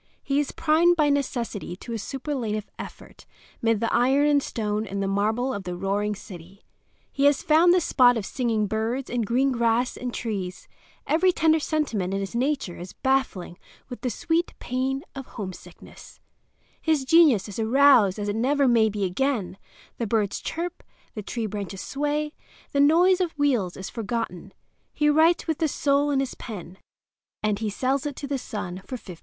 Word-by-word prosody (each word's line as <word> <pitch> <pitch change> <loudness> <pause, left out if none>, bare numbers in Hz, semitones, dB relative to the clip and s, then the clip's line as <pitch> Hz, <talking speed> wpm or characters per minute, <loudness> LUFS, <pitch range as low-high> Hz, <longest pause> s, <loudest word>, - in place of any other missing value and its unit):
He 275 0 +1
is 290 - -1
primed 335 +3 +3
by 305 -3 +3
necessity 240 -9 -2
to 235 +5 -8
a 225 - -3
superlative 235 -5 -4
effort; - - -10 0.3
mid 225 -2 +2
the 230 - 0
iron 270 +4 +3
and 290 -1 +4
stone 215 -3 -2
and 200 +1 -4
marble 220 +6 0
of 200 - -4
the 180 -1 -5
roaring 205 +3 -1
city 190 -1 -12 0.5
he 275 - 0
has 285 -1 +4
found 325 +3 +5
this 360 -2 +3
spot 245 -2 +5
of 210 - -3
singing 230 -4 0
birds 225 +5 -2
and 235 -3 -1
green 265 +4 +2
grass 235 0 +1
and 250 -1 -4
trees; 195 -6 -4 0.4
every 365 +4 +3
tender 320 -2 +3
sentiment 235 - -1
in - - -1
his 195 +2 -5
nature 255 -6 -1
is 180 +1 -8
battling 265 -10 -1 0.3
with 245 - -8
the 255 - -1
sweet 335 +7 -1
pain 265 +2 -2
of 270 -1 -8
homesickness; 190 -4 -10 0.6
his 310 -4 +1
genius 280 - +5
is 205 +1 -7
aroused 230 -4 +5
as 205 -1 -3
it 205 - -1
never 275 +4 +2
may 230 -3 +4
be 205 -1 -3
again; 200 +1 -1 0.4
the 230 - -1
birds 210 -2 0
chirp, 350 +2 -4 0.3
the 215 - -5
tree 225 +3 -4
branches 200 -2 -5
sway, 295 +2 -2 0.4
the 280 - 0
noise 350 +6 +5
of 335 -4 -2
wheels 245 -11 +1
is 190 - -6
forgotten; 220 -5 -4 0.4
he 300 0 +3
writes 320 +3 +4
with 320 -2 -2
his 320 - +2
soul 285 0 +2
in 280 -2 +1
his 270 -1 -2
pen—and 205 +1 -7
he 220 -1 -1
sells 265 +7 -1
it 290 - -5
to 285 - -6
the 275 -1 -2
Sun 185 -6 -6
for 255 - -6
$15. 180 -7 -11
245 Hz, 175 wpm, -25 LUFS, 205-285 Hz, 0.6 s, found